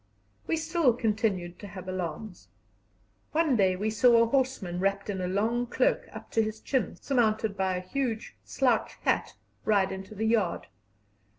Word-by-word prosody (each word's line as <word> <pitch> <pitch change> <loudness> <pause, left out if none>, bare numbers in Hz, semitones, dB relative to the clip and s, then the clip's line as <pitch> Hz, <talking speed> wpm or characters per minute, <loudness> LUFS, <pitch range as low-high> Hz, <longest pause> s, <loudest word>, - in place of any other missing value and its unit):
We 325 - +1
still 320 -5 +2
continued 210 -6 -1
to 205 - -8
have 185 -1 -9
alarms. 185 +2 -5 0.9
One 315 -4 +3
day 190 -4 +3
we 210 +4 -1
saw 235 +2 +5
a 230 - +6
horseman 230 -8 0
wrapped 195 +2 0
in 190 -2 -4
a 180 - -1
long 225 +6 0
cloak - - +1
up - - -10
to 225 - +3
his 220 0 -3
chin, 255 -6 -1
surmounted 220 -5 +1
by 190 -1 0
a - - -3
huge 245 -2 -2
slouch - - +1
hat, - - 0 0.3
ride 200 -3 +2
into 190 +2 -7
the 220 +2 -1
yard. 220 -6 +1
215 Hz, 165 wpm, -28 LUFS, 190-240 Hz, 0.9 s, a